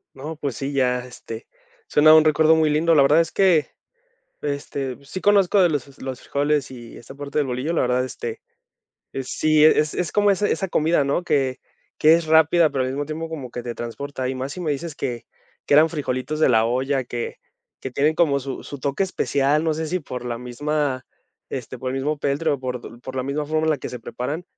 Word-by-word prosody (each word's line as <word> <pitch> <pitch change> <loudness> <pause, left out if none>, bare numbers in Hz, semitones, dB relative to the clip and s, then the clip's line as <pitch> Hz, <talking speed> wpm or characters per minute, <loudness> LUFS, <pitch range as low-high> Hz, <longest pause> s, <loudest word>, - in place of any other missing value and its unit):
No, 150 +4 -6
pues 140 -5 -4
sí, 140 +1 -4
ya, 125 -2 +2
este, 115 -2 -9 0.4
suena 155 +1 +6
un 155 -1 +8
recuerdo 155 +1 +4
muy 160 -1 +3
lindo. 160 +3 +3
La 150 - +6
verdad 145 +4 +5
es 165 -1 +1
que 180 -6 +3 0.7
este, 140 -2 -4
sí 185 +7 -6
conozco 200 -1 +4
de 175 - +5
los 140 -3 -4
los 130 -1 -5
frijoles 145 -1 0
y 120 -2 -11
esta 120 - -12
parte 145 +1 -6
del 150 - +2
bolillo, 130 +5 -2
la - - +2
verdad, 125 0 +1
este, 120 -3 -6 0.8
sí, 155 +3 +2
es 155 -1 +4
es 175 -3 -2
como 205 -1 +3
ese 205 +2 +1
esa 195 - -1
comida, 160 -2 +2
¿no? 140 +6 0
Que, 135 -6 0 0.4
que 155 +2 +7
es 170 - -1
rápida, 160 +1 +4
pero 130 -2 0
al 130 - -2
mismo 140 +2 -3
tiempo 160 +2 -5
como 140 -7 -7
que 120 - -5
te 120 -1 -6
transporta. 130 +3 -5
Y 130 - -2
más 130 +2 -4
si 180 - -7
me 155 -4 -1
dices 155 +2 -4
que 120 -4 -4 0.4
que 145 - +4
eran 155 +2 +6
frijolitos 150 -1 -3
de 155 - +4
la 110 -1 +4
olla, 130 +3 0
que 120 -1 -5 0.4
que 130 - -6
tienen 150 +5 +1
como 145 -5 +3
su 135 0 -6
su 145 - -8
toque 140 +7 0
especial, 145 -5 +1
no 160 -1 0
sé 160 +1 -3
si 180 +4 -1
por 125 -4 -7
la 120 -1 -3
misma 135 +2 -2 0.4
este, - - -6
por 130 0 -4
el - - -3
mismo 150 +3 -1
peltre 145 +1 0
por 125 -2 -6
por 130 +1 -8
la 130 - 0
misma 140 +3 -2
forma 155 +1 0
en - - +2
la 155 - +2
que - - -6
se 125 - -7
preparan, 145 +9 -5
145 Hz, 220 wpm, -22 LUFS, 130-155 Hz, 0.8 s, un